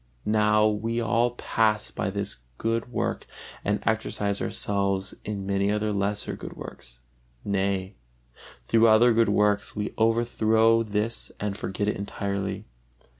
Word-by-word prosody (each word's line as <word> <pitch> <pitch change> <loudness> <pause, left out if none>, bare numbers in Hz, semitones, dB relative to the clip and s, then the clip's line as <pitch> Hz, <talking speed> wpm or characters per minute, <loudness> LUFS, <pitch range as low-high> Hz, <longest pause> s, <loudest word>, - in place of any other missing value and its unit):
Now 105 0 +3
we 110 +2 -1
all 115 +1 +2
pass 110 -3 +1
by - - -2
this 100 +1 -3 0.2
good 115 +2 -1
work - - -2 0.4
and 105 +1 0
exercise 105 -2 0
ourselves 100 -1 0
in 100 -2 -4
many 100 +1 +1
other 105 0 0
lesser 100 +1 -1
good - - -8
works, - - -9 0.4
nay, 95 -1 -1 0.7
through 115 - +4
other 115 +2 +6
good 115 0 +3
works 105 -1 +2
we 105 0 -3
overthrow 115 0 +3
this 110 +1 -2
and 105 -1 -2
forget 100 0 -3
it 105 - 0
entirely. 100 -1 -3
105 Hz, 130 wpm, -26 LUFS, 100-110 Hz, 0.7 s, other